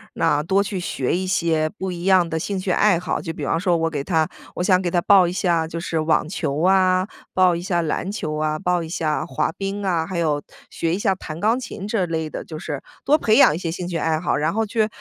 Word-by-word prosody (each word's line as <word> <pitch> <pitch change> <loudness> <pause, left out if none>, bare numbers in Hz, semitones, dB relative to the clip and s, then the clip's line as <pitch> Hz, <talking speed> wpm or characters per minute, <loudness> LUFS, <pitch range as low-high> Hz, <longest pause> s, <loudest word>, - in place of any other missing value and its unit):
那 145 0 +2
多 190 +5 +2
去 200 -2 -4
学 140 -7 -1
一 185 +1 -2
些 165 -4 +1
不 190 -1 -5
一 175 0 -6
样 185 -3 +4
的 160 -1 -2
兴 200 +4 -3
趣 185 0 -2
爱 185 -1 +3
好， 180 - -2
就 165 - -4
比 150 -3 -5
方 165 - 0
说 175 -2 +2
我 165 0 0
给 145 -3 -3
他 160 -3 +1 0.3
我 - - -2
想 185 0 +4
给 175 - -1
他 175 - +1
报 190 -1 +5
一 175 - -2
下 170 -3 +1
就 165 - -5
是 165 -2 -2
网 155 0 +1
球 155 -4 -2
啊， 185 0 +3 0.2
报 185 -2 +4
一 170 - -4
下 175 -1 0
篮 170 +4 -2
球 155 -7 -3
啊， 155 0 0
报 180 +2 0
一 160 - -6
下 160 -3 -1
滑 160 - -1
冰 195 +1 -4
啊， 170 -3 +1
还 185 -2 -4
有 150 -3 0 0.3
学 165 +1 -1
一 - - -2
下 200 -3 +2
弹 160 -4 -8
钢 225 +6 +2
琴 230 -5 -7
这 210 -4 0
类 160 -1 -2
的， - - -6
就 155 - -8
是 150 -3 -5 0.2
多 295 +3 +5
培 220 -4 +3
养 - - +7
一 - - -3
些 175 - -3
兴 175 +2 -4
趣 175 -2 -2
爱 160 0 0
好。 175 - 0
然 155 +2 0
后 225 +1 0
去 215 0 +1
175 Hz, 280 characters per minute, -22 LUFS, 160-190 Hz, 0.3 s, 养